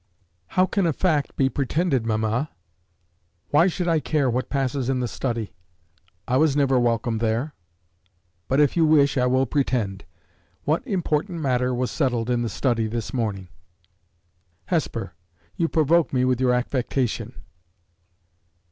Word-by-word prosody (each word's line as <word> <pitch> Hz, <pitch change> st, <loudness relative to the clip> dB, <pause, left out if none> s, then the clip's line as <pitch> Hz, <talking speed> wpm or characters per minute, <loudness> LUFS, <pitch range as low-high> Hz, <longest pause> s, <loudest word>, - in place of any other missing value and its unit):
"How 185 Hz, -, +6 dB
can 190 Hz, -1 st, 0 dB
a 160 Hz, -, +1 dB
fact 155 Hz, -4 st, 0 dB
be 135 Hz, -, +2 dB
pretended, 135 Hz, -2 st, 0 dB
mamma? 110 Hz, +6 st, 0 dB, 1.0 s
Why 165 Hz, +5 st, +5 dB
should 180 Hz, -1 st, -2 dB
I 165 Hz, -2 st, +3 dB
care 145 Hz, -4 st, 0 dB
what 125 Hz, +2 st, -2 dB
passes 135 Hz, -2 st, -1 dB
in 130 Hz, -1 st, +1 dB
the 125 Hz, -, -1 dB
study? 115 Hz, -5 st, -3 dB, 0.7 s
I 125 Hz, -, +2 dB
was 150 Hz, -1 st, +3 dB
never 135 Hz, -3 st, +3 dB
welcome 115 Hz, -1 st, 0 dB
there. 115 Hz, +6 st, -1 dB, 0.9 s
But, 135 Hz, -, +1 dB
if 145 Hz, -2 st, +3 dB
you 170 Hz, -, +3 dB
wish, 145 Hz, -3 st, +4 dB
I 125 Hz, -2 st, +2 dB
will 130 Hz, +1 st, +2 dB
pretend. 115 Hz, -8 st, -1 dB, 0.6 s
What 155 Hz, +3 st, +1 dB
important 175 Hz, -, -1 dB
matter 125 Hz, -3 st, +1 dB
was 125 Hz, 0 st, -1 dB
settled 125 Hz, -5 st, 0 dB
in 120 Hz, -1 st, +1 dB
the 120 Hz, -, -1 dB
study 115 Hz, -4 st, 0 dB
this 115 Hz, 0 st, -4 dB
morning?" 105 Hz, -7 st, -2 dB, 1.2 s
"Hesper, 115 Hz, -, -2 dB, 0.4 s
you 165 Hz, -, +1 dB
provoke 160 Hz, +1 st, +2 dB
me 125 Hz, -1 st, +2 dB
with 130 Hz, 0 st, +1 dB
your 125 Hz, -1 st, +3 dB
affectation!" 125 Hz, -1 st, -2 dB
130 Hz, 145 wpm, -24 LUFS, 120-150 Hz, 1.2 s, How